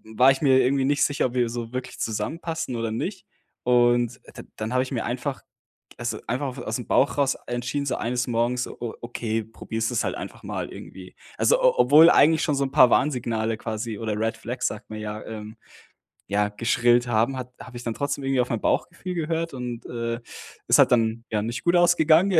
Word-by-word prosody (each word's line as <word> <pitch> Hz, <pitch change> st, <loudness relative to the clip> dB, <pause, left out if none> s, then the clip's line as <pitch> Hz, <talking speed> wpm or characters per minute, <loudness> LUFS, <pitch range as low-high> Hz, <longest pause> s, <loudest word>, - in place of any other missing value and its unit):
war 130 Hz, +4 st, +6 dB
ich 135 Hz, -, -2 dB
mir 135 Hz, -3 st, +5 dB
irgendwie 135 Hz, +1 st, +2 dB
nicht 145 Hz, +1 st, +2 dB
sicher, 145 Hz, -2 st, +1 dB
ob 120 Hz, -, -9 dB
wir 125 Hz, -1 st, +2 dB
so 115 Hz, 0 st, -5 dB
wirklich 130 Hz, 0 st, -5 dB
zusammenpassen 160 Hz, +4 st, -3 dB
oder 115 Hz, -1 st, -2 dB
nicht. 185 Hz, -, -4 dB, 0.4 s
Und 120 Hz, 0 st, +3 dB, 0.2 s
d -, -, -8 dB
dann 110 Hz, +2 st, -4 dB
habe 130 Hz, -, +3 dB
ich 130 Hz, -, -9 dB
mir 120 Hz, -4 st, -2 dB
einfach 130 Hz, +3 st, -3 dB, 0.6 s
also, -, -, -3 dB
einfach 130 Hz, +1 st, -2 dB
ausm 120 Hz, +1 st, -4 dB
Bauch 140 Hz, -, +2 dB
raus 140 Hz, -1 st, +2 dB
entschieden, 125 Hz, +4 st, -2 dB
so -, -, 0 dB
eines 125 Hz, +2 st, -2 dB
Morgens 120 Hz, +1 st, 0 dB
so, -, -, -10 dB
o 120 Hz, -2 st, -4 dB
okay, 115 Hz, -2 st, -2 dB
probierst 110 Hz, 0 st, -4 dB
es -, -, 0 dB
halt -, -, -1 dB
einfach -, -, -8 dB
mal -, -, -4 dB
irgendwie. -, -, -11 dB, 0.2 s
Also, -, -, +4 dB
o -, -, +4 dB
obwohl 155 Hz, +6 st, +8 dB
eigentlich 160 Hz, +1 st, +5 dB
schon 150 Hz, -, +1 dB
so 140 Hz, -, +1 dB
'n 135 Hz, -, -5 dB
paar 125 Hz, -2 st, +6 dB
Warnsignale 115 Hz, -5 st, +1 dB
quasi 110 Hz, 0 st, -4 dB
oder 110 Hz, -1 st, -2 dB
Red 115 Hz, +1 st, -1 dB
Flags, -, -, -3 dB
sagt -, -, -6 dB
man 110 Hz, -, -5 dB
ja, 105 Hz, 0 st, -5 dB
ähm, 110 Hz, 0 st, -8 dB, 0.7 s
ja, 105 Hz, +1 st, +1 dB
geschrillt 120 Hz, +3 st, +2 dB
haben, 120 Hz, +3 st, +1 dB
hat 125 Hz, -1 st, -6 dB
habe 125 Hz, -, -9 dB
ich 120 Hz, -, -10 dB
dann 115 Hz, -, -2 dB
trotzdem 140 Hz, +1 st, -2 dB
irgendwie 135 Hz, -1 st, +1 dB
auf 125 Hz, -, -6 dB
mein 115 Hz, -, -1 dB
Bauchgefühl 180 Hz, +1 st, -1 dB
gehört 165 Hz, -1 st, -2 dB
und, 125 Hz, -2 st, -6 dB
äh, 115 Hz, 0 st, -3 dB, 0.5 s
ist -, -, +5 dB
halt -, -, +5 dB
dann 115 Hz, -1 st, +2 dB
ja 105 Hz, -, 0 dB
nicht 115 Hz, +3 st, -4 dB
gut 175 Hz, -, +3 dB
ausgegangen, 175 Hz, +1 st, +5 dB
125 Hz, 205 wpm, -24 LUFS, 115-140 Hz, 0.7 s, obwohl